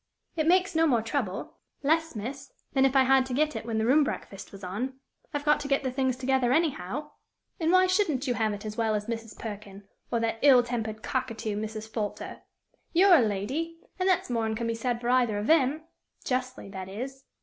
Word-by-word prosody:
"It 315 -2 0
makes 370 +2 +4
no 325 0 +3
more 240 -6 +2
trouble 225 -5 -3 0.3
less, 320 +1 +1
miss, 270 +6 -6 0.2
than 270 -1 +4
if 270 0 +2
I 265 - +7
had 265 0 +5
to 250 - -3
get 305 0 +1
it 225 +1 -5
when 225 -1 -1
the 220 - +1
room 285 +5 +5
breakfast 195 -7 -6
was 195 0 -12
on. 230 +9 -3 0.4
I've 290 0 -3
got 295 0 +4
to 290 - -5
get 275 0 +1
the 260 - -1
things 260 -1 0
together 260 -1 +1
anyhow; 295 - 0 0.5
and 325 0 +2
why 370 0 +6
shouldn't 365 - +1
you 250 - +1
have 220 -2 0
it 205 +1 -6
as 210 0 -5
well 220 -1 +1
as 210 0 -2
Mrs. 225 -1 -5
Perkin, 205 -2 -8 0.2
or 235 - +1
that 225 0 -1
ill 260 -4 +7
tempered 225 -3 -4
cockatoo, 230 -4 -2
Mrs. 215 +1 -5
Folter? 215 -2 -5 0.5
You're 370 +2 +6
a 320 - +8
lady, 255 +11 -2 0.2
and 370 +1 +2
that's 365 -8 +1
more'n 225 -2 0
can 235 +1 -3
be 230 - 0
said 235 +1 -2
for 240 0 -3
either 245 -4 +3
of 205 - -2
them 305 +1 +3 0.4
justly, 255 -3 -2
that 190 -1 -7
is." 265 +7 -7
250 Hz, 215 wpm, -28 LUFS, 220-285 Hz, 0.5 s, a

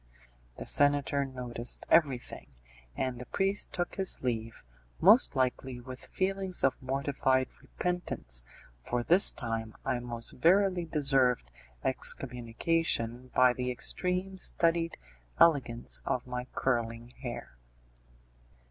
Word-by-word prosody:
The - - -6
senator 145 -1 +5
noticed 125 -2 -2
everything, 140 -7 +1 0.5
and 130 -2 -3
the 125 - -8
priest 195 +1 0
took 175 -1 -4
his 190 -7 +1
leave, 115 -2 -3 0.4
most 210 - +6
likely 130 -1 -1
with 130 +1 -9
feelings 190 -1 -2
of 135 - +1
mortified 130 -1 0
repentance, 175 - -3 0.4
for 120 - -3
this 175 +9 +5
time 115 -3 -5
I 125 - 0
most 120 -1 -4
verily 185 +3 +2
deserved 135 - +1 0.3
excommunication 125 0 -1
by 125 -1 +5
the 125 0 -3
extreme 180 +8 -2
studied 165 -1 +2 0.4
elegance 120 - +2
of 125 - -2
my 125 0 -5
curling 120 -2 -1
hair. 120 - -7
130 Hz, 110 wpm, -30 LUFS, 120-165 Hz, 0.5 s, most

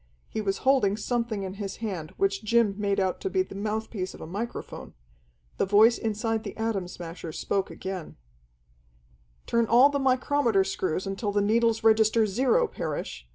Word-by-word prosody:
He 220 - -4
was 195 -2 -1
holding 255 -7 +3
something 230 -2 -2
in 190 -1 -5
his 195 -1 -4
hand 185 -9 -5
which 195 +1 0
Jim 225 -1 +3
made 200 -1 0
out 190 -2 -1
to 390 - -2
be 375 0 +1
the - - -12
mouthpiece 210 -1 -3
of - - -13
a - - -6
microphone. 205 +8 -6 0.6
The - - +1
voice 220 +4 +5
inside 220 0 -1
the - - -7
Atom 220 -5 -1
Smasher 170 -2 -8
spoke 195 +5 -2
again: 190 -3 -6 1.3
"Turn 235 -1 +1
all 250 +5 +6
the 285 - 0
micrometer 255 -5 +2
screws 190 -2 -2
until 195 +2 -2
the 205 - +1
needles 225 +2 +2
register 220 0 +4
zero, 260 - +2
Parrish. - - -5
215 Hz, 165 wpm, -27 LUFS, 195-235 Hz, 1.3 s, all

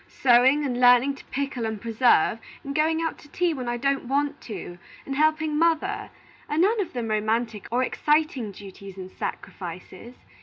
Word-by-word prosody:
Sewing, 260 +4 +4
and 250 -3 -2
learning 250 +2 +6
to 275 - -14
pickle 275 -3 -3
and 220 -1 -4
preserve, 230 0 +3 0.2
and 280 - -5
going 320 +2 +1
out 325 - -3
to 295 - -16
tea 350 +1 0
when 255 -4 -4
I 240 - -1
don't 275 +1 0
want 285 +2 -1
to, 175 -4 -7 0.3
and 275 - -4
helping 310 0 +2
mother, 335 +5 +1 0.4
are 300 - -1
none 410 +6 +3
of 370 - -5
them 235 -3 -3
romantic 220 0 -1
or 250 +2 +2
exciting 295 -5 0
duties 195 0 -11
and 185 0 -8
sacrifices. 185 +6 -7
260 Hz, 175 wpm, -25 LUFS, 225-300 Hz, 0.4 s, learning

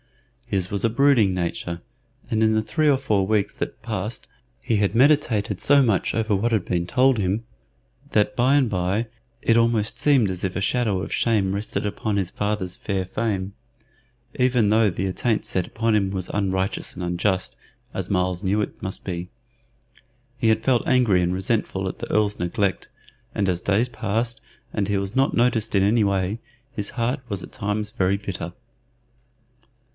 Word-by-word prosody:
His 95 -2 0
was 100 - -2
a 115 - +3
brooding 115 -5 +4
nature, 85 -1 -3 0.5
and 110 -3 +1
in 110 0 +4
the 110 0 +1
three 155 +5 +1
or 140 - +4
four 105 -8 +1
weeks 105 0 0
that - - -5
passed 105 0 -4 0.3
he 115 - 0
had 100 +1 +1
meditated 120 -7 +3
so 145 0 +5
much 110 -7 +1
over 110 -2 +1
what 115 +5 0
had 110 -5 +1
been 85 -1 -1
told 130 +4 +3
him, 100 +4 -1 0.7
that 110 +5 +2
by 130 +3 +3
and 135 -5 +3
by 95 +4 0 0.3
it 115 - +3
almost 115 -2 +2
seemed 135 -8 +3
as 90 -1 -4
if 95 -2 -2
a - - 0
shadow 105 -2 0
of - - -5
shame 105 -5 +1
rested 105 +1 -3
upon 105 0 -2
his 95 -3 -1
father's 105 -3 -2
fair 95 -3 -2
fame, 100 -1 -2 0.8
even 125 -4 +3
though 110 0 +4
the 90 +1 -3
attaint 105 +4 0
set 90 -2 -1
upon 115 0 0
him 100 -2 +2
was 95 -2 -4
unrighteous 95 0 -1
and 90 - -5
unjust, 90 +2 -1 0.4
as - - -4
Myles 90 -1 0
knew 100 +2 +1
it 105 - -4
must 95 - -5
be. 90 -1 -4 1.1
He 115 -3 +1
had 110 0 +2
felt 125 -1 +2
angry 120 -8 +4
and 90 0 0
resentful 95 0 -1
at 95 - -5
the - - -5
Earl's 105 -1 +1
neglect, 95 +3 -1 0.5
and 100 - +1
as 90 -1 0
days 105 +6 +2
passed 115 0 -2 0.3
and 100 - 0
he 100 -1 +1
was 100 +2 -4
not 135 +1 +2
noticed 115 -3 +1
in 95 - +4
any 110 +3 +3
way, 100 +2 0 0.3
his 105 -7 -3
heart 125 +3 -1
was 100 -3 -4
at - - -11
times 105 0 -2
very 100 -3 +1
bitter. 100 -4 -5
105 Hz, 180 wpm, -23 LUFS, 95-115 Hz, 1.1 s, so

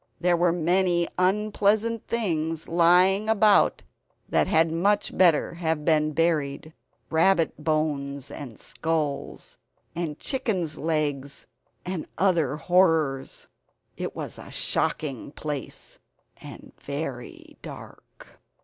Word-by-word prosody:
There 175 0 +3
were 175 0 +2
many 175 +1 +1
unpleasant 210 +3 +1
things 165 -8 -2
lying 180 +5 +4
about 215 -1 +4 0.4
that - - +2
had 160 0 +3
much 195 +6 +1
better 170 -5 +3
have 160 -3 -2
been 155 -1 +2
buried; 155 -1 -1 0.4
rabbit 165 -1 +2
bones 140 -3 -1
and 125 -6 -9
skulls, 155 -4 -3 0.4
and 160 -3 -3
chickens' 195 - -2
legs 145 -3 -2 0.4
and 180 -3 -4
other 170 -8 +2
horrors. 160 -7 +1 0.5
It - - -5
was - - -6
a - - -11
shocking 140 -2 -2
place, 150 -3 -7 0.4
and - - -11
very 140 -4 -7
dark. - - -12
165 Hz, 105 wpm, -25 LUFS, 150-185 Hz, 0.5 s, lying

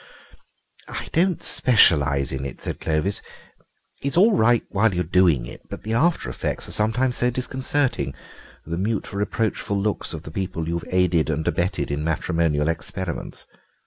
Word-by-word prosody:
"I - - -6
don't 180 +1 +2
specialise 70 - +4
in 65 0 -3
it," 70 - -6
said - - -5
Clovis; 80 +6 0 0.8
"it's 140 +4 0
all 210 +4 +6
right 115 +1 +4
while 100 -1 +2
you're 90 - +1
doing 85 -7 +3
it, - - -9
but - - -8
the 110 - -3
after 160 +9 +2
effects - - -3
are - - -8
sometimes 120 +4 +1
so 125 - +2
disconcerting—the 125 - -3
mute 105 +2 -2
reproachful 105 0 -1
looks 105 +1 -1
of 80 - -8
the 80 - -9
people 90 -2 -3
you've 85 0 -2
aided 90 -3 +2
and 80 +1 -2
abetted 85 0 0
in 70 +1 -2
matrimonial 80 -1 0
experiments. 80 +2 -4
95 Hz, 150 wpm, -23 LUFS, 80-115 Hz, 0.8 s, all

